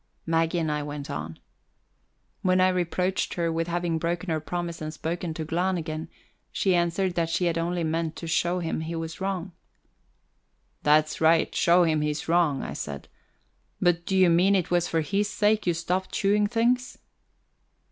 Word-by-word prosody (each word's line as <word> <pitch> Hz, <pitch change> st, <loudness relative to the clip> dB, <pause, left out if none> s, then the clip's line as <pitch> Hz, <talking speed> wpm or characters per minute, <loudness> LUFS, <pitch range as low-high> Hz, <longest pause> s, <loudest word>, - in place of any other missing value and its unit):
Maggie 165 Hz, +1 st, +1 dB
and 160 Hz, -2 st, 0 dB
I 150 Hz, 0 st, -1 dB
went 145 Hz, -1 st, -6 dB
on. 80 Hz, +1 st, -5 dB, 1.0 s
When 185 Hz, 0 st, +2 dB
I 185 Hz, 0 st, +5 dB
reproached 180 Hz, +1 st, -1 dB
her 170 Hz, -1 st, 0 dB
with 165 Hz, +1 st, -1 dB
having 170 Hz, -1 st, -1 dB
broken 170 Hz, +2 st, -2 dB
her 160 Hz, -, 0 dB
promise 170 Hz, +1 st, -4 dB
and 155 Hz, 0 st, -4 dB
spoken 165 Hz, +2 st, -4 dB
to 160 Hz, -, -4 dB
Glahn 180 Hz, +4 st, 0 dB
again, 160 Hz, 0 st, -5 dB, 0.4 s
she 190 Hz, -, +1 dB
answered 175 Hz, +2 st, +1 dB
that 170 Hz, -1 st, 0 dB
she 175 Hz, +2 st, 0 dB
had 170 Hz, -1 st, +1 dB
only 170 Hz, +1 st, -1 dB
meant 160 Hz, 0 st, -1 dB
to -, -, -7 dB
show 175 Hz, +2 st, +1 dB
him 165 Hz, -3 st, -2 dB
he 165 Hz, +1 st, -4 dB
was 165 Hz, +2 st, -5 dB
wrong. 190 Hz, -1 st, -2 dB, 1.3 s
"That's 155 Hz, +1 st, +3 dB
right 160 Hz, 0 st, +4 dB
show 175 Hz, +1 st, +4 dB
him 155 Hz, -2 st, +2 dB
he's 150 Hz, 0 st, -2 dB
wrong," 165 Hz, -5 st, +2 dB
I -, -, -5 dB
said. 70 Hz, -1 st, -6 dB, 0.7 s
"But 175 Hz, -1 st, +1 dB
do 190 Hz, -, +1 dB
you 185 Hz, -2 st, +5 dB
mean 185 Hz, +4 st, +4 dB
it 180 Hz, -3 st, 0 dB
was 175 Hz, 0 st, +2 dB
for 165 Hz, -, 0 dB
his 200 Hz, +6 st, 0 dB
sake 210 Hz, -1 st, +1 dB
you 175 Hz, -, +2 dB
stopped 180 Hz, +3 st, -2 dB
chewing 205 Hz, +1 st, +2 dB
things?" 240 Hz, +3 st, 0 dB
170 Hz, 180 wpm, -26 LUFS, 160-180 Hz, 1.3 s, I